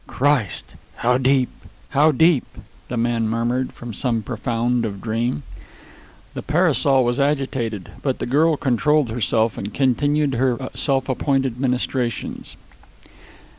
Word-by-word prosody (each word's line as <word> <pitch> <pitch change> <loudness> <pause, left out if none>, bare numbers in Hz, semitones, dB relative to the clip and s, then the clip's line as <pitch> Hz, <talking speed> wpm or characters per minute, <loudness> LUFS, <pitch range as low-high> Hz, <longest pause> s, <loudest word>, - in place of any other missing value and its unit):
"Christ! 135 -8 0 0.2
How 125 +1 +1
deep! 130 -1 +3 0.4
How 150 +3 +4
deep!" 160 -1 +3 0.4
the 125 - -4
man 115 -1 +1
murmured 120 +3 -1
from 120 -1 -9
some 115 0 -1
profound 120 +2 -1
of 100 -3 -4
dream. 115 -8 -2 0.9
The - - -5
parasol 150 -5 +3
was 120 +3 0
agitated; 135 - -1
but 135 -3 -1
the - - -3
little 120 - -7 0.2
girl - - -9
controlled 145 +1 +2
herself 110 -1 0
and 100 +2 -5
continued 145 +3 +1
her 125 0 +1 0.2
self 135 -2 0
appointed 135 -2 0
ministrations. 125 -2 -2
125 Hz, 130 wpm, -21 LUFS, 115-140 Hz, 0.9 s, How